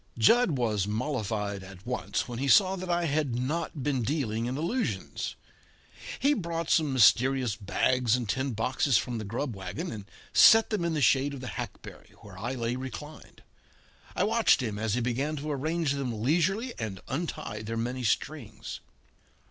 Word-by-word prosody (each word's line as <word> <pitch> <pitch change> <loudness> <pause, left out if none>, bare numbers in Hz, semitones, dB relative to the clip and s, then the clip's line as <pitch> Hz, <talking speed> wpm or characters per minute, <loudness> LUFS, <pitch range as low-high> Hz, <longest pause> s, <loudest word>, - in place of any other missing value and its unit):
Jud 175 - +4
was 105 -5 0
mollified 105 -4 -2
at 95 0 -12
once 125 0 -2
when 120 -1 -5
he 140 - -1
saw 190 +5 +5
that 185 -1 -6
I 175 0 +1
had 145 -5 0
not 145 +3 -2
been 135 -3 0
dealing 115 -4 -1
in 130 +2 -3
allusions. 160 - -2 0.8
He 280 +3 +3
brought 170 - -3
some 155 -4 +3
mysterious 130 -1 +4
bags 120 +3 +1
and 125 -3 -3
tin 130 +5 -1
boxes 125 +3 +2
from 120 -2 -2
the - - -4
grub 115 +4 -3
wagon 95 - -5
and 105 -3 -7 0.3
set 225 +1 +7
them 210 -5 0
in 170 -1 0
the 150 - +1
shade 140 +2 +3
of - - -8
the 130 - -5
hackberry - - -8
where - - -12
I 120 +4 -4
lay 120 0 -2
reclined. 140 +4 -9 0.7
I - - +1
watched 225 +2 +4
him 105 -3 -3
as 110 0 0
he 125 - 0
began 130 +6 -1
to 150 +1 -4
arrange 155 +2 -1
them 125 -6 -3
leisurely 190 - +1
and 105 -4 -4
untie 135 -8 -4
their 115 +1 -4
many 125 +3 -2
strings. 115 -1 -3
130 Hz, 170 wpm, -28 LUFS, 115-155 Hz, 0.8 s, set